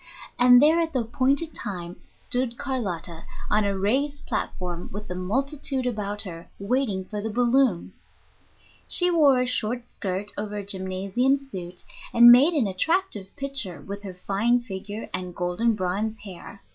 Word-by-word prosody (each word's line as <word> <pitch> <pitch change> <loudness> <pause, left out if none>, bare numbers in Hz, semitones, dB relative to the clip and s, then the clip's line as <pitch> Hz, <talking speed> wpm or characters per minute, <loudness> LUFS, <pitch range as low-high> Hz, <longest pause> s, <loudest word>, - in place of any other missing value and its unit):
And 245 0 +8
there 310 +5 +5
at 325 -1 -1
the 255 - +1
appointed 270 +7 0
time 180 -4 -6 0.2
stood 245 -1 -2
Carlotta 190 - -4 0.3
on 210 0 +3
a 200 -1 0
raised 275 +9 0
platform, 175 -1 -4
with 210 +2 -7
the - - -4
multitude 265 +8 -2
about 210 -4 -1
her, 170 -4 -9
waiting 200 -3 -1
for 210 +1 -5
the 220 - -3
balloon. 245 -3 +2 0.9
She 355 0 +1
wore 290 -6 +5
a - - +1
short 240 -1 0
skirt 195 -3 -4
over 210 0 -4
a 205 - -5
gymnasium 195 +7 0
suit, 185 -10 -8 0.3
and 240 0 +10
made 280 +8 +6
an 275 -7 +3
attractive 205 - 0
picture 275 - -2
with 200 +7 -7
her 195 -3 -8
fine 225 +7 +1
figure 205 0 -6
and 180 -1 -4
golden 180 +6 0
bronze 205 +4 -2
hair. 200 0 -11
215 Hz, 155 wpm, -25 LUFS, 190-260 Hz, 0.9 s, and